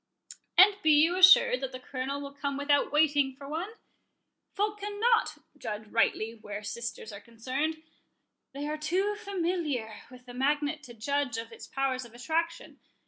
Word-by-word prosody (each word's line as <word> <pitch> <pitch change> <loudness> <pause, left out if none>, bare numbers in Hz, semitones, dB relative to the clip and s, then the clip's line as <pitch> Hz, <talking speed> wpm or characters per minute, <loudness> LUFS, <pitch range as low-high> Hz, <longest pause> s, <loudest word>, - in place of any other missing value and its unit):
"And 400 +2 +7
be 315 - +2
you 320 +4 +4
assured 370 -8 +7
that 265 -1 -3
the 255 - -7
Colonel 260 +2 -4
will 280 0 -8
come 280 -1 -3
without 285 0 +2
waiting 290 -3 +2
for 275 +1 -11
one," 325 +7 -3
said 450 - -16
Charles. - - -32 0.8
"Folk 420 +1 -1
cannot 420 +3 +1 0.2
judge 215 0 -5
rightly 225 0 +1
where 210 -2 -8
sisters 235 0 -6
are 200 - -9
concerned—they 285 +3 -6
are 305 +1 -3
too 370 +7 0
familiar 345 - -2 0.2
with 250 -1 -15
the 245 - -10
magnet 290 +4 0
to 240 - -12
judge 280 +2 -1
of 225 0 -6
its - - -11
powers 265 -1 -1
of 235 -1 -14
attraction. 330 +6 -3
285 Hz, 165 wpm, -29 LUFS, 250-330 Hz, 0.8 s, And